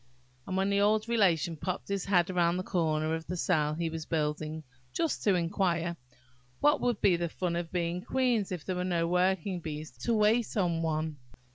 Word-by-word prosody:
And 185 - -2
when 195 +1 +1
the 200 0 +2
old 215 +2 +2
Relation 180 -8 +2
popped 180 +4 -4
his 200 -2 -2
head 180 -2 +2
round 175 -1 +2
the 185 - -2
corner 160 -4 0
of 160 0 -4
the 180 - -3
cell 155 -4 +1
he 165 +1 -1
was 160 -1 -5
building, 155 0 -2 0.3
just 330 -3 -1
to 200 -3 +4
inquire, 170 -1 0 0.6
"What 295 0 +3
would 240 -4 0
be 185 - +5
the 170 0 -2
fun 175 0 -2
of 170 -1 -3
being 175 -1 -1
queens, 245 -4 0
if 175 -5 -5
there 185 -1 -2
were 180 - -1
no 175 -2 0
working 180 +1 +1
bees 155 -1 -6
to 235 - 0
wait 215 +2 +2
on 170 -4 +1
one?" 155 -1 -1
175 Hz, 195 wpm, -30 LUFS, 165-195 Hz, 0.6 s, be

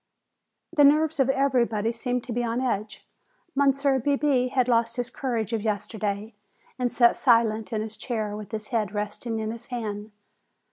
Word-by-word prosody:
The 295 - +6
nerves 305 +2 +4
of 270 -1 +3
everybody 240 -5 +1
seemed 245 +1 -2
to 245 - -5
be 240 +1 -1
on 235 +1 -1
edge. 220 -4 -3 0.5
Monsieur 275 -1 +2
Bebé 275 -1 +1
had 255 -1 +1
lost 230 -1 +2
his 245 0 -2
courage 235 -5 -2
of 225 - 0
yesterday 210 0 -3 0.5
and 245 -1 0
sat 240 -1 +4
silent 230 -3 +2
in 215 -1 -1
his 220 0 -7
chair 215 -3 -3
with 210 -1 -8
his 215 +1 -5
head 215 -5 -1
resting 210 +3 -3
in 220 0 -2
his 230 +1 -8
hand. 215 -4 -4
235 Hz, 170 wpm, -26 LUFS, 215-255 Hz, 0.5 s, The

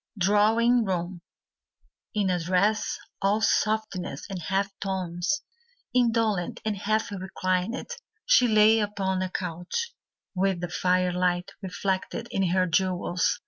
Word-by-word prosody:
Drawing 220 +5 +4
Room 180 -2 -3 0.9
In 200 -3 +2
a 180 - +1
dress 185 +5 +1 0.2
all 200 +2 +2
softness 215 -8 0
and 185 -2 -4
half 195 +4 0
tones, 190 - -2 0.5
Indolent 225 -7 +1
and 215 -1 0
half 215 +2 -1
reclined, 190 - -2 0.3
She - - +5
lay 215 0 +5
upon 195 -3 -1
a 185 - -1
couch, 180 - -4 0.4
With 190 -1 +1
the 175 0 -4
firelight 180 0 +1
reflected 190 +4 -3
in 195 -3 +1
her 185 +1 +2
jewels. 180 0 0
190 Hz, 115 wpm, -26 LUFS, 180-215 Hz, 0.9 s, She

